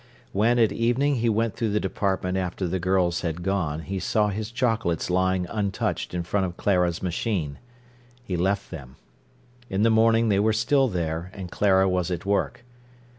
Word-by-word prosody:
When 115 +5 +2
at 115 -3 +4
evening 125 +5 +1
he 115 0 +1
went 115 0 0
through 115 -2 -1
the 105 +1 +1
department 95 -1 -1
after 90 0 -2
the 95 +2 -2
girls 90 -1 +1
had 85 0 -3
gone, 85 -5 -1
he 95 +3 -4
saw 105 +2 +1
his 105 +2 -4
chocolates 115 -9 0
lying 95 0 +1
untouched 100 -3 -2
in 85 - -1
front 95 +2 0
of 85 - -9
Clara's 90 -4 +1
machine. 90 -5 -2 0.6
He 95 -7 -3
left 95 +3 -1
them. 65 -6 -9 0.7
In 95 +2 0
the 115 - +4
morning 115 +1 +4
they 100 -1 +3
were 110 +2 +3
still 130 +5 +2
there, 85 -3 -3
and 95 -3 -7
Clara 95 -2 +3
was 90 -1 0
at 90 -1 -4
work. 110 +4 -1
95 Hz, 175 wpm, -25 LUFS, 90-110 Hz, 0.7 s, at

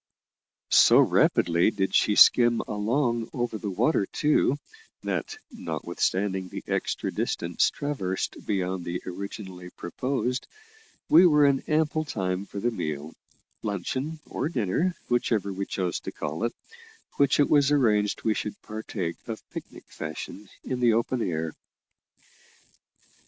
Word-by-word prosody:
So - - +7
rapidly 85 +2 +4
did 95 -3 -2
she 105 - +3
skim 120 +1 +6
along 115 +2 -1
over 120 -3 -2
the 105 - -4
water 100 - +1
too, 150 -2 +2 0.5
that, 435 +1 -3
notwithstanding 95 - -2
the - - -7
extra - - -1
distance - - 0
traversed 115 -11 -3
beyond 95 -2 -1
that 85 +1 -4
originally 95 -1 -7
proposed, 125 +8 -3 0.6
we 175 +3 +8
were 150 -3 +5
in 140 -1 +4
ample 155 0 +2
time 95 -7 -3
for 100 - -6
the 120 +4 0
meal 75 -6 -4 0.5
luncheon 130 - -3
or 150 - -3
dinner, 155 - 0
whichever 115 -5 0
we 100 +1 -4
chose 90 -2 -2
to - - -6
call 80 +10 -3
it 120 - -2 0.6
which 140 0 +3
it 145 - +5
was 145 -2 +4
arranged 105 -8 +2
we 110 - +2
should 105 - -4
partake 105 -5 -4
of 115 -2 -6
picnic - - -8
fashion 80 +6 -7
in 130 -1 -3
the 120 -2 +4
open 120 +2 0
air. 80 -5 -2
110 Hz, 130 wpm, -26 LUFS, 95-130 Hz, 0.6 s, we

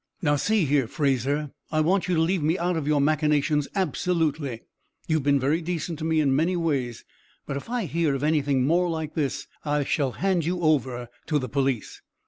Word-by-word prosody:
"Now 145 -5 +2
see 205 +5 +2
here, 140 -3 +2
Fraser, 140 +2 0 0.2
I 155 -1 +2
want 180 +4 +2
you 180 - +1
to 160 - +2
leave 175 +2 +1
me 160 +4 +1
out 175 0 0
of 155 -3 -2
your 150 -1 +3
machinations, 150 0 +2
absolutely. 160 - -1 0.4
You've 155 -1 +1
been 140 0 +3
very 145 +6 +1
decent 165 -1 -3
to 155 - -3
me 160 -1 +2
in 140 -3 +3
many 170 +5 +1
ways, 140 -8 -2 0.4
but 140 - -4
if 140 - -6
I 240 -3 -1
hear 160 -1 0
of 135 - -4
anything 145 -4 +2
more 175 +4 +2
like 160 -2 -3
this 145 -4 -2 0.2
I 145 -1 0
shall 135 -2 0
hand 190 -3 0
you 175 +3 -1
over 130 -6 +1 0.2
to 150 - +2
the 130 -3 -2
police." 135 -3 -1
150 Hz, 200 wpm, -25 LUFS, 140-165 Hz, 0.4 s, your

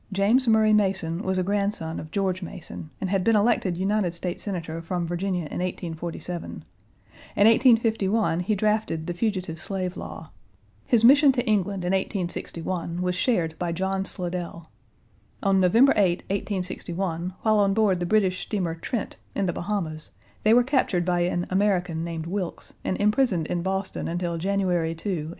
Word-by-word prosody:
James 210 +7 +3
Murray 220 -1 +5
Mason 190 -4 +1
was 190 -2 -1
a 185 - +1
grandson 200 -4 -1
of 155 - -8
George 190 0 -1
Mason, 175 -3 -8
and 190 - -3
had 195 -2 +1
been 225 +3 +3
elected 205 -4 +2
United 190 -2 0
States 175 +1 -4
Senator 165 -5 -4
from 175 +1 -2
Virginia 180 +2 -1
in 150 - -5
1847. 175 -1 -5 0.7
In 200 - +4
1851 225 -5 +3
he 195 +4 0
drafted 210 -6 0
the 175 - -3
Fugitive 185 -4 -2
Slave 185 -1 -3
Law. - - -8 0.6
His 235 -2 +3
mission 280 +3 +7
to 245 -1 -1
England 200 -4 0
in 180 - 0
1861 175 -2 -2
was 180 0 0
shared 175 -4 +1
by 175 -1 -1
John 190 +2 -1
Slidell. 175 -3 -5 0.7
On 195 -1 +3
November 225 +9 +5
8, 185 -3 +2
1861, 185 -2 -3
while 215 -1 +4
on 200 -1 +3
board 205 -5 +3
the 175 - -2
British 190 -2 +2
steamer 185 -6 -2
Trent, 205 +7 -4 0.2
in 200 - 0
the 175 - 0
Bahamas, 170 -5 -3 0.3
they 220 +2 +5
were 245 - +6
captured 240 - +1
by 175 -1 +1
an 175 0 0
American 180 -4 +1
named 165 -1 -4
Wilkes, 180 0 -4
and 185 - -1
imprisoned 210 - +2
in 175 +2 -2
Boston 190 +1 -2
until 170 0 -2
January 180 -3 0
2, 165 +6 -5
1862. 160 -5 -2
185 Hz, 165 wpm, -25 LUFS, 175-205 Hz, 0.7 s, mission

